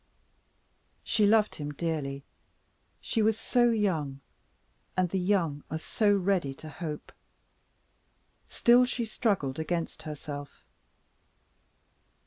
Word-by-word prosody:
She 210 -2 +3
loved 215 0 +4
him 145 -1 -5
dearly; 145 -3 -3 0.8
she 225 - 0
was 220 0 +3
so 240 +1 +3
young 165 -12 0 0.8
and 185 -1 +3
the 190 - -1
young 180 -6 +1
are 160 - -2
so 205 +6 +1
ready 190 -8 +1
to 155 - -10
hope! 155 -1 -6 1.4
Still, 245 +1 +5
she 245 -2 -2
struggled 195 - -1
against 165 0 -2
herself. 145 -2 -8
175 Hz, 105 wpm, -29 LUFS, 150-210 Hz, 1.4 s, Still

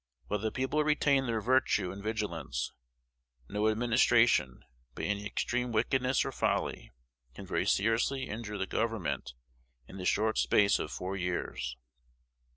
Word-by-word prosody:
While 105 - -2
the 110 +1 -2
people 135 +4 0
retain 140 -3 +2
their 115 -2 0
virtue 120 -6 +2
and 100 - -8
vigilance, 105 - -3 0.7
no 105 +5 +1
administration, 115 - +3 0.3
by - - -5
any 105 0 -1
extreme 125 +3 -1
wickedness 125 +4 +1
or - - -2
folly, - - -1 0.4
can - - -8
very - - -1
seriously 115 +6 +1
injure 105 -1 -5
the 95 - -1
Government 90 - -2 0.5
in 95 - -10
the 90 - -5
short 110 +4 +2
space 100 -1 +4
of - - -4
four 95 +2 -4
years. 90 -8 -3
110 Hz, 140 wpm, -31 LUFS, 100-125 Hz, 0.7 s, space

